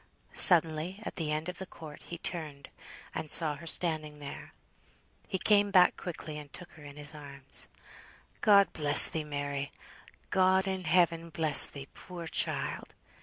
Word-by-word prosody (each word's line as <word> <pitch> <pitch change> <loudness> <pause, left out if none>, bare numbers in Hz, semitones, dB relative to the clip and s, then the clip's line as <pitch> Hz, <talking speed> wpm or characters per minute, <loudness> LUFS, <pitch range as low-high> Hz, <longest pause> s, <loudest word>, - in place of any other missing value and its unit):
Suddenly, 165 +2 +5
at - - -10
the 160 -4 -5
end 155 +2 -5
of 180 0 -9
the 190 - -10
court, 155 -4 -15
he 170 - -11
turned, 155 -5 -8 0.4
and 155 - -8
saw 155 -1 +1
her 165 +3 -14
standing 155 -3 -2
there; 145 -1 -12 0.8
he 190 - -5
came 205 +1 0
back 185 -2 +2
quickly, 160 -4 -10
and 145 -2 -15
took 180 -1 -13
her 155 - -18
in 145 -1 -14
his 145 0 -6
arms. 140 -2 -11 0.7
"God 200 -2 +2
bless 145 -2 +7
thee, 160 - -6
Mary! 145 -1 -7 0.6
God 190 +1 0
in 190 -1 -6
heaven 170 -2 -1
bless 155 -3 +6
thee, 140 -1 -13
poor 175 -2 -12
child!" - - -4
160 Hz, 160 wpm, -27 LUFS, 150-180 Hz, 0.8 s, bless